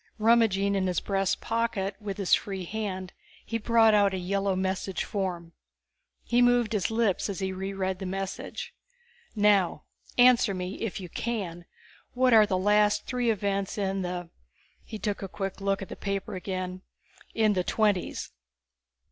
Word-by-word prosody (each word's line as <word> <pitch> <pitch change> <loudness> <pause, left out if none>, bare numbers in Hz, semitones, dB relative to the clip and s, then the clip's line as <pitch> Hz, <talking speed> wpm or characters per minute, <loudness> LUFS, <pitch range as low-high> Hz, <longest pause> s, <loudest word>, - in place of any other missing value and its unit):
Rummaging 215 -3 +3
in 190 -1 +1
his 180 - 0
breast 195 -1 -1
pocket 225 -4 -1
with 200 -2 -5
his 195 -3 +1
free 195 -3 0
hand, 190 -2 -4 0.3
he 230 - -2
brought 225 0 +4
out 200 -2 +4
a - - -2
yellow 195 +1 0
message 190 0 -2
form. 180 -5 -4 0.7
He 240 0 +2
moved 245 -2 +3
his 205 -4 0
lips 220 -4 +1
as 195 - -4
he 190 -1 -2
reread 190 0 -3
the 190 - -4
message. 195 +1 -5 0.6
"Now 205 -6 +3 0.3
answer 245 -4 +5
me 185 +1 -5
if 225 -4 -3
you 185 - -7
can 175 -4 -4 0.5
what 255 0 +3
are 215 -2 +7
the 190 -3 +1
last 210 +2 +3
three 245 -2 0
events 200 -2 -1
in 195 -1 -1
the 175 -1 -4 0.2
..." - - -35 0.2
He 220 - -7
took 205 -1 -3
a 195 - -4
quick 195 +1 -5
look 195 0 0
at - - -10
the - - -6
paper 200 -1 -3
again. 185 0 -4 0.3
"... - - -26
in 210 - +4
the 185 -2 0
Twenties?" 205 -2 0
195 Hz, 165 wpm, -28 LUFS, 190-215 Hz, 0.7 s, are